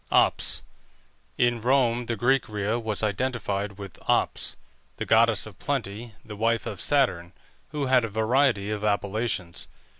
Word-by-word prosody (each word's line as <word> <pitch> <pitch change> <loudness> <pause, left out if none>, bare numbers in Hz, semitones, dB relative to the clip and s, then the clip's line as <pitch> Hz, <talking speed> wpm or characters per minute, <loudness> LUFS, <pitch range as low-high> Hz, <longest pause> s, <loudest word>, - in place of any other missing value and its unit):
OPS. - - +3 0.7
In 120 -1 +2
Rome 120 -1 +2
the 115 - -1
Greek 120 +4 +2
Rhea 105 +2 -1
was 110 -2 -2
identified 105 -2 -1
with 100 -3 -9
Ops, - - +1 0.4
the - - -3
goddess 115 -1 +4
of 110 -4 -12
plenty, 115 -5 -3
the 105 - -8
wife 115 +2 +1
of 100 - -5
Saturn, 95 -12 +1 0.3
who 145 -1 -3
had 130 -2 +4
a 115 - -2
variety 110 -1 +2
of 105 -1 -3
appellations. 100 -3 -1
110 Hz, 145 wpm, -26 LUFS, 105-120 Hz, 0.7 s, goddess